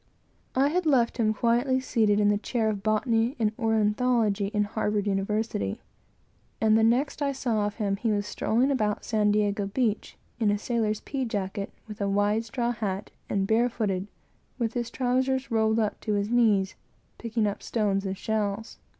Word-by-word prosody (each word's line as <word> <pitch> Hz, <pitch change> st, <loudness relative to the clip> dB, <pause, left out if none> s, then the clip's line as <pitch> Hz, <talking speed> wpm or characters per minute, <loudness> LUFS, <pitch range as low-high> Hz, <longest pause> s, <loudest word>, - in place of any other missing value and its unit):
I 270 Hz, +2 st, +4 dB
had 350 Hz, +1 st, 0 dB
left 245 Hz, -6 st, +3 dB
him 215 Hz, -2 st, +3 dB
quietly 240 Hz, +4 st, +2 dB
seated 220 Hz, -5 st, +2 dB
in 205 Hz, -1 st, +4 dB
the 205 Hz, 0 st, +2 dB
chair 225 Hz, 0 st, 0 dB
of 205 Hz, -2 st, -3 dB
Botany 225 Hz, +3 st, +1 dB
and 215 Hz, -2 st, +1 dB
Ornithology, 220 Hz, -1 st, +2 dB
in 210 Hz, 0 st, 0 dB
Harvard 210 Hz, -1 st, -1 dB
University; 200 Hz, -, -1 dB, 0.8 s
and 220 Hz, 0 st, +4 dB
the 225 Hz, -, +4 dB
next 255 Hz, +6 st, +2 dB
I 280 Hz, -1 st, +1 dB
saw 225 Hz, -6 st, 0 dB
of 205 Hz, -, -6 dB
him, 200 Hz, -3 st, -1 dB
was 210 Hz, -3 st, +1 dB
strolling 245 Hz, +6 st, +1 dB
about 215 Hz, -6 st, 0 dB
San 215 Hz, -2 st, +2 dB
Diego 205 Hz, -1 st, +1 dB
beach, 215 Hz, 0 st, -1 dB, 0.2 s
in 220 Hz, -3 st, +2 dB
a 205 Hz, -, +2 dB
sailor's 215 Hz, -1 st, -1 dB
pea 275 Hz, -2 st, -3 dB
jacket, 200 Hz, -3 st, -3 dB, 0.2 s
with 210 Hz, -1 st, -8 dB
a 200 Hz, -, +1 dB
wide 205 Hz, +3 st, +1 dB
straw 235 Hz, +2 st, -1 dB
hat, 205 Hz, -4 st, -4 dB, 0.2 s
and 195 Hz, -1 st, 0 dB
barefooted, 220 Hz, -4 st, 0 dB, 0.5 s
with 230 Hz, -2 st, -1 dB
his 240 Hz, -2 st, -2 dB
trowsers 260 Hz, +1 st, 0 dB
roiled 220 Hz, -1 st, +2 dB
up 215 Hz, -2 st, -1 dB
to 215 Hz, -, -1 dB
his 205 Hz, +2 st, -1 dB
knees, 210 Hz, -6 st, +3 dB, 0.5 s
picking 230 Hz, -1 st, -1 dB
up 205 Hz, -1 st, -2 dB
stones 200 Hz, -4 st, 0 dB
and 190 Hz, -1 st, -3 dB
shells. 215 Hz, 0 st, -2 dB
220 Hz, 170 wpm, -27 LUFS, 205-235 Hz, 0.8 s, I